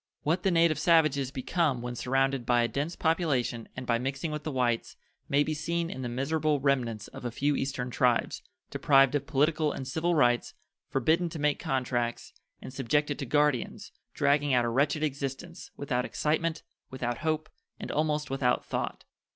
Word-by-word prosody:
What 165 +5 +1
the 195 - +2
native 165 -3 +3
savages 155 -5 +3
become 135 -1 -1
when 120 0 -4
surrounded 135 +1 0
by 120 0 +3
a - - +2
dense 145 +7 -3
population 145 -8 0
and 125 - -5
by 115 -1 +1
mixing 135 +5 -3
with 150 -1 -3
the 155 - -4
whites 120 -3 0 0.3
may 140 +1 +4
be 155 - -2
seen 170 +2 -2
in 130 - -6
the 125 - -3
miserable 145 +4 0
remnants 125 -6 0
of - - -10
a 120 - -2
few 140 +5 0
Eastern 130 -2 -3
tribes, 125 -2 +1 0.3
deprived 135 -2 +4
of 140 -1 -1
political 155 +1 +2
and 130 - -6
civil 165 +5 0
rights, 120 -5 +2 0.3
forbidden 160 +7 +2
to 160 - -7
make 150 -1 +1
contracts, 120 -2 -2 0.3
and 130 - -8
subjected 145 +3 0
to 135 - -4
guardians, 145 -2 0 0.2
dragging 145 -1 +2
out 120 -1 +3
a - - 0
wretched 145 +5 +1
existence, 145 +4 -4
without 125 -3 -1
excitement, 160 +4 -1 0.3
without 120 -2 -3
hope, 155 -1 -1 0.3
and - - -5
almost 150 -2 0
without 130 -2 +1
thought. - - -3
140 Hz, 175 wpm, -29 LUFS, 125-155 Hz, 0.3 s, may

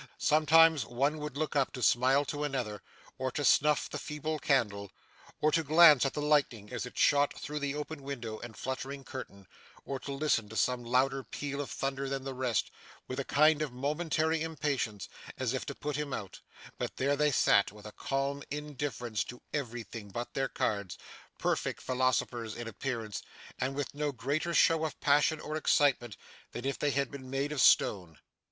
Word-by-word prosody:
Sometimes 160 - +5
one 140 +7 0
would 150 -2 -5
look 155 0 -2
up 140 -2 +2
to 125 - -5
smile 130 +5 +4
to 145 0 -3
another, 125 -8 -3 0.4
or 130 0 0
to 145 - -1
snuff 150 +1 +4
the - - -5
feeble 150 +1 -4
candle, 105 -9 0 0.5
or 155 - +4
to 165 - +3
glance 155 -3 +7
at - - -5
the 150 - -2
lightning 135 -9 +1
as - - -3
it - - -13
shot 145 0 +3
through 150 +1 -4
the 145 0 -2
open 150 0 -5
window 120 -6 -5
and 120 -2 -9
fluttering 135 +1 -4
curtain, 100 -8 -8 0.4
or 135 -1 -4
to 140 - -7
listen 135 -7 0
to 110 - -9
some 125 +1 +1
louder 130 +3 +1
peal 140 +1 -4
of 140 - -6
thunder 135 0 -3
than 135 -1 -3
the 135 0 -4
rest, 125 -5 -1 0.4
with 130 +1 -4
a - - 0
kind 155 +4 +4
of 150 -4 -2
momentary 155 +4 0
impatience, 145 -10 -2 0.3
as 130 -2 -1
if 130 - -3
it 140 - -8
put 150 -1 -3
him 150 -2 -3
out; 100 -4 -8 0.4
but - - -4
there 140 +2 +2
they 150 +1 +3
sat, 100 -7 +4
with 105 0 -14
a 105 - -7
calm 140 +3 -2
indifference 145 -6 -3
to 125 - -10
everything 115 -6 -5
but 120 +5 -5
their 135 -1 -1
cards, 100 -4 -2 0.4
perfect - - -1
philosophers 125 -3 0
in 120 -1 -6
appearance, 115 -2 -4 0.4
and 135 +1 -1
with 145 -1 -3
no 145 0 -1
greater 140 +7 -2
show 165 -1 +4
of 160 - -3
passion 145 +2 +3
or 155 - -5
excitement 135 -7 +2 0.4
than 120 - -5
if 140 - -2
they 150 - +1
had 140 -1 0
been 130 -2 -9
made 135 +2 -1
of 150 -4 0
stone. 90 -6 +4
135 Hz, 185 wpm, -31 LUFS, 120-150 Hz, 0.5 s, glance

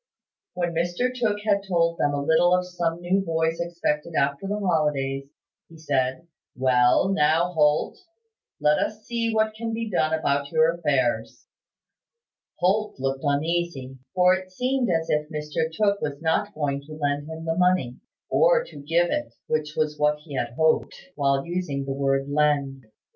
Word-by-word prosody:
When 175 -1 -1
Mr 175 +10 0
Tooke 220 -5 -1
had 200 -2 +2
told 170 -2 +1
them 145 0 +1
a 140 - -2
little 175 +4 +4
of 180 0 0
some 175 -1 -2
new 185 +3 +1
boys 165 -1 0
expected 170 -2 -2
after 140 +6 0
the 205 +1 -1
holidays, 150 -7 0 0.4
he 165 - -14
said: 135 0 -1 0.3
"Well, 125 +5 +3
now, 165 0 +2
Holt, 150 -2 +2 0.6
let 150 0 +3
us 215 0 -3
see 230 -1 -1
what 220 0 +1
can 225 +1 -4
be 225 -1 -4
done 155 -3 +1
about 140 -3 0
your 160 +1 +3
affairs." 130 -9 -1 1.1
Holt 205 0 0
looked 135 0 -2
uneasy; 145 -3 -1 0.2
for 180 0 +5
it 185 0 -4
seemed 250 +4 0
as 165 -2 0
if 150 0 0
Mr 155 +1 -2
Tooke 200 +3 +1
was 140 -1 -3
not 165 +6 0
going 140 -2 -1
to 155 - -9
lend 145 -1 -2
him 160 0 -7
the 165 - 0
money, 180 -8 +1 0.3
or - - +4
to - - -13
give 165 +4 +1
it, 115 -1 -3
which 155 -1 -2
was 150 -1 -1
what 150 0 +3
he 150 - -10
had 120 -3 -2
hoped, 160 0 +2 0.2
while 140 -1 +1
using 170 -6 -3
the 135 - -2
word 135 0 0
"lend." 140 -3 0
160 Hz, 165 wpm, -25 LUFS, 140-180 Hz, 1.1 s, for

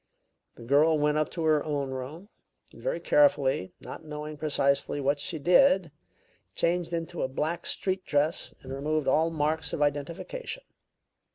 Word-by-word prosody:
"The - - -12
girl 150 +6 +4
went 150 0 +2
up 155 - 0
to 165 - -4
her 155 -2 +3
own 140 -3 -2
room, 140 +10 -7 0.4
and - - -14
very - - -1
carefully, 135 - +3
not - - -9
knowing 150 0 -6
precisely 140 -2 0
what 140 +1 +1
she 160 +3 -4
did, 180 - +4 0.6
changed 170 0 0
into 170 0 -3
a - - +1
black 155 +6 -3
street 190 -1 -1
dress 150 0 0
and 130 0 -7
removed 150 +2 -1
all 160 +5 +3
marks 155 0 -1
of - - -2
identification. 165 - -3
155 Hz, 155 wpm, -28 LUFS, 145-170 Hz, 0.6 s, girl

